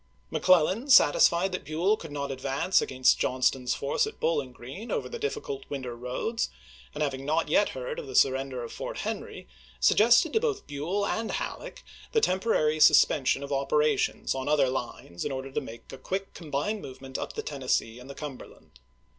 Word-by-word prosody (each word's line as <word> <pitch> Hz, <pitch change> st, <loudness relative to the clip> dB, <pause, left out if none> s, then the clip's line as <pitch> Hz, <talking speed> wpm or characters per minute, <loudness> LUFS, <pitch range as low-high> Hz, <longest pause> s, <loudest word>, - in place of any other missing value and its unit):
McClellan, 185 Hz, -, +3 dB
satisfied 180 Hz, -, +5 dB
that 185 Hz, -, -4 dB
Buell 170 Hz, +7 st, +1 dB
could 165 Hz, -8 st, -10 dB
not 140 Hz, -1 st, -3 dB
advance 135 Hz, +7 st, +1 dB
against 130 Hz, -1 st, +2 dB
Johnston's 125 Hz, 0 st, +1 dB
force 140 Hz, -, 0 dB
at 440 Hz, -, -9 dB
Bowling 145 Hz, -6 st, 0 dB
Green 135 Hz, -, -9 dB
over -, -, -1 dB
the 475 Hz, -, -7 dB
difficult 440 Hz, -1 st, -4 dB
winter 130 Hz, -4 st, -5 dB
roads, 125 Hz, -, -3 dB, 0.5 s
and 150 Hz, -, -1 dB
having 135 Hz, -2 st, -3 dB
not 155 Hz, +4 st, 0 dB
yet -, -, +3 dB
heard -, -, -4 dB
of 475 Hz, -, -8 dB
the 410 Hz, -, -7 dB
surrender 130 Hz, -2 st, +2 dB
of 115 Hz, -, -8 dB
Fort -, -, -6 dB
Henry, -, -, -5 dB, 0.3 s
suggested 235 Hz, -, +5 dB
to -, -, +4 dB
both 435 Hz, -3 st, -2 dB
Buell 170 Hz, +8 st, -2 dB
and 225 Hz, +2 st, -2 dB
Halleck -, -, -5 dB, 0.3 s
the 450 Hz, -, +4 dB
temporary 185 Hz, -, +1 dB
suspension 140 Hz, -2 st, +5 dB
of 140 Hz, 0 st, -4 dB
operations 150 Hz, +2 st, +1 dB
on 135 Hz, +1 st, -3 dB
other 145 Hz, -3 st, +3 dB
lines 120 Hz, -8 st, -5 dB
in -, -, -3 dB
order 135 Hz, 0 st, -5 dB
to -, -, -2 dB
make 115 Hz, +2 st, -11 dB
a 135 Hz, -, -9 dB
quick 190 Hz, +7 st, -4 dB
combined 165 Hz, +7 st, -3 dB
movement 130 Hz, 0 st, -8 dB
up -, -, -5 dB
the -, -, -4 dB
Tennessee 130 Hz, -4 st, -2 dB
and 125 Hz, +2 st, -12 dB
the 140 Hz, -, -8 dB
Cumberland. 135 Hz, -, -10 dB
145 Hz, 180 wpm, -28 LUFS, 130-200 Hz, 0.5 s, satisfied